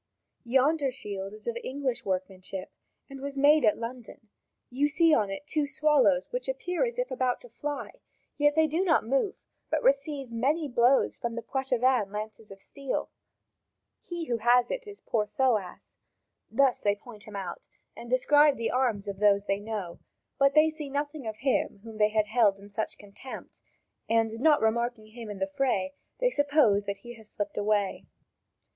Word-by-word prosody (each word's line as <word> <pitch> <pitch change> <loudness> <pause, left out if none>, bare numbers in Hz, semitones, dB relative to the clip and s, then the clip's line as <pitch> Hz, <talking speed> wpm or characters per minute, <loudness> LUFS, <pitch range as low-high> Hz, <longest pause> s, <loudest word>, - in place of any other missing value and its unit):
Yonder 270 +4 +3
shield 200 -6 -6
is 215 0 -12
of 235 - -2
English 260 -2 -2
workmanship 185 0 -4 0.4
and 275 -1 -10
was 280 0 -5
made 290 +1 +5
at 215 -2 +4
London; 230 -2 -8 0.4
you 280 +4 +1
see 325 +2 +4
on 210 -7 +3
it 195 +9 -6
two 295 -1 0
swallows 290 -2 +3
which - - -3
appear 360 -6 -1
as 475 -1 -2
if - - -2
about 255 -1 0
to - - -14
fly; 285 +5 -5 0.4
yet 295 0 +3
they 320 0 +5
do 320 +4 0
not 325 - +3
move, 275 - 0 0.3
but - - 0
receive 310 - +1
many 285 +7 0
blows 245 +1 +3
from 235 -2 -3
the 235 - -4
Poitevin 255 -4 +1
lances 215 +1 -6
of 195 - -11
steel; 275 +6 -4 0.9
he 345 -2 -5
who 240 -5 -1
has 240 +2 +4
it - - -4
is 410 -1 -8
poor 210 -2 -1
Thoas." 225 -9 -1 0.5
Thus 265 +2 +3
they 205 0 +1
point 215 0 -13
out 195 -4 -6 0.3
and 235 - -10
describe 290 +3 +4
the 230 - -1
arms 235 -6 0
of 195 -1 -5
those 205 -1 +4
they 195 -1 0
know; 205 -5 -5 0.4
but 275 +1 +4
they 310 +1 +6
see 305 -2 -6
nothing 290 -1 -3
of 220 - -3
him 260 -6 0
whom 225 -1 -10
they 210 0 +5
had 215 -1 +2
held 215 -2 +3
in 200 +1 -14
such 215 +2 -3
contempt, 205 +6 -11 0.5
and, 225 -1 +2
not 300 +2 +4
remarking 225 0 0
him 225 0 -9
in 205 - -6
the 190 - 0
fray, 195 -3 -1 0.3
they - - +2
suppose 285 - +3
that 200 0 -4
he 240 - -7
has 220 -1 -8
slipped 205 -1 -4
away. 205 -2 0
245 Hz, 175 wpm, -28 LUFS, 210-285 Hz, 0.9 s, they